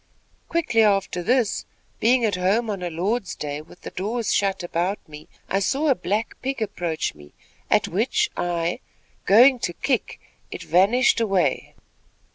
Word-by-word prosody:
Quickly 290 -9 +2
after 195 -4 +2
this, 235 +3 +1 0.4
being 240 +1 +3
at 210 - 0
home 200 +5 +1
on 195 -3 -5
a 175 - -3
Lord's 190 +4 -2
Day, 145 0 -5
with 155 - -17
the - - -8
doors 220 +4 -2
shut 195 -2 0
about 175 +3 -1
me, 150 0 -12 0.2
I 195 - 0
saw 275 +10 0
a - - +6
black 215 0 -2
pig 270 0 -3
approach 180 -7 -2
me, 75 -1 -16 0.4
at - - +3
which 260 - +1
I, 170 -1 -1 0.5
going 245 +6 +7
to 175 - -2
kick, - - -2 0.3
it - - -7
vanished 205 +10 +3
away. 195 -6 0
200 Hz, 155 wpm, -23 LUFS, 175-235 Hz, 0.5 s, going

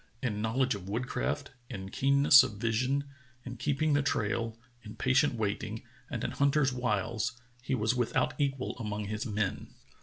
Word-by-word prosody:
In 105 -4 -1
knowl 115 +5 +1
edge 130 -1 +1
of 100 -2 -7
woodcraft, 125 +5 -2 0.2
in 95 0 -6
keenness 140 +2 +6
of 130 -5 -2
vision, 125 +5 0 0.4
in 125 -1 -6
keeping 145 +4 +1
the 145 - +4
trail, 115 -3 -1 0.2
in 110 -1 -10
patient 130 +1 +2
waiting, 105 -3 -3 0.3
and - - -4
in - - -1
hunter's 140 -1 +2
wiles 115 0 -1 0.2
he 135 +1 -1
was 110 0 +1
without 125 -2 +1
equal 135 -2 -1
among 105 -2 -3
his 110 +4 -3
men. 105 -3 -2
120 Hz, 160 wpm, -30 LUFS, 110-135 Hz, 0.4 s, keenness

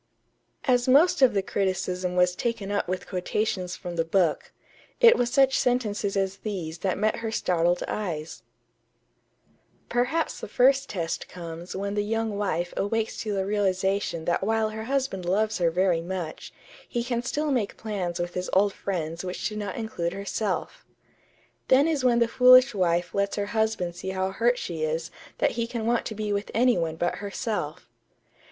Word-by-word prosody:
As 245 -2 +3
the 255 - +3
most 305 +3 +5
of 250 -5 +5
the 195 - +2
criticism 185 -2 -1
was 180 0 +3
taken 225 -4 -2
up 205 - 0
with 185 +1 -3
quotations 185 0 -2
from 175 -2 -7
the 165 - +2
book, 165 -1 +1 0.5
it 475 -1 +8
was 245 -1 +1
such 270 +1 +4
sentences 215 -5 0
as 195 0 0
these 175 -7 -5
that 185 0 -1
met 215 +2 +1
her 225 -1 -3
startled 175 -4 +1
eyes: 165 -7 -4 1.5
"Perhaps 250 +7 0
the - - -6
first 270 +2 +3
test 170 -4 -3
comes 170 0 -8
when 200 +1 -3
the 205 - +1
young 225 0 -1
wife 175 -4 -1
awakes 225 +2 -1
to 215 -2 -2
the 190 -1 -1
realization 195 -3 0
that 170 - +1
while 220 +1 +1
her 220 0 -6
husband 265 -7 -1
loves 205 +4 0
her 170 -1 +3
very 175 0 +2
much, 175 -2 -5 0.4
he 240 - -1
can 240 -1 -1
still 295 +4 -1
make 235 -7 -1
plans 190 -6 -3
with 175 0 -3
his 180 0 -3
old 200 +1 +4
friends 170 -3 -4
which 180 0 -3
do 215 - -6
not 205 -2 -4
include 220 -7 -3
herself.... 200 0 -3 0.8
Then 275 +4 +5
is 305 -5 0
when 245 -2 +4
the 235 -1 +3
foolish 255 +2 +7
wife 175 -2 0
lets 200 0 0
her 205 - -1
husband 220 -6 0
see 190 - -5
how 190 0 -1
hurt 240 +5 +2
she 170 -8 -5
is 160 +1 -2 0.3
that - - +2
he 230 0 -2
can 230 -2 -4
want 235 0 +1
to 215 - -6
be 210 -1 -2
with 200 +1 -2
any 245 +2 +4
one 165 -2 -1
but 175 +2 -1
herself.... 200 - -4
200 Hz, 180 wpm, -26 LUFS, 180-230 Hz, 1.5 s, it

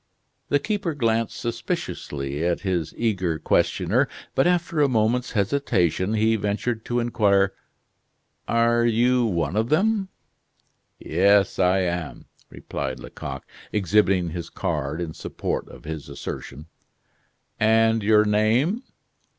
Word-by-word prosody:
The 145 - +4
keeper 175 0 -2
glanced 115 -4 0
suspiciously 75 - -4
at 85 0 0
his 90 -5 -1
eager 95 -8 0
questioner, - - +1 0.3
but 135 - +3
after 175 -3 +1
a 145 - +5
moment's 120 +1 +1
hesitation, 100 - +1
he 110 +1 +3
ventured 110 +3 -2
to 120 0 0
inquire: 100 -5 +2 0.9
"Are 115 0 +3
you 120 +2 +3
one 85 -5 -1
of 110 +2 0
them?" 195 +4 +2 0.9
"Yes, 100 +3 +2
I 95 +1 +3
am," 85 -2 -3 0.2
replied - - -5
Lecoq, 65 -1 -7 0.3
exhibiting 95 -3 +2
his 85 0 -5
card 80 -3 -3
in 80 -2 -4
support - - -4
of - - -13
his 80 -1 -6
assertion. 75 +3 -7 0.9
"And 110 +1 +3
your 105 +1 +4
name?" 115 - +2
110 Hz, 120 wpm, -24 LUFS, 90-120 Hz, 0.9 s, a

